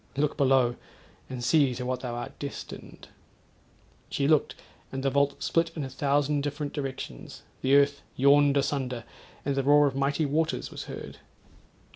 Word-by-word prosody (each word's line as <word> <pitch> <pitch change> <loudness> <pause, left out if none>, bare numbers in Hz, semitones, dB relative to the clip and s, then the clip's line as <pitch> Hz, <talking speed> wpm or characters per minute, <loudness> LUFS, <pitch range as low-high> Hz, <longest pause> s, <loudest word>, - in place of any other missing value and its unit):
Look 150 0 +1
below! 130 -4 +3 0.5
and 125 -2 -5
see 130 0 +3
to 125 +1 -4
what 130 0 -1
thou 125 -2 -4
art 120 - -7
destined.' 140 -1 -8 1.0
She 140 - 0
looked, 155 -1 +3 0.3
the 135 0 -1
vault 140 +1 +1
split 165 0 +2
in 155 - -3
a 135 - -6
thousand 145 +1 +1
different 145 0 -3
directions; 135 - -6 0.2
the 135 +1 +4
earth 140 0 +4
yawned 140 +1 +5
asunder; 130 -4 -1 0.4
and 140 - +1
the 135 - +1
roar 145 +2 +5
of 135 -2 0
mighty 140 +3 +1
waters 155 +3 -1
was - - -7
heard. - - -8
140 Hz, 155 wpm, -28 LUFS, 130-145 Hz, 1.0 s, yawned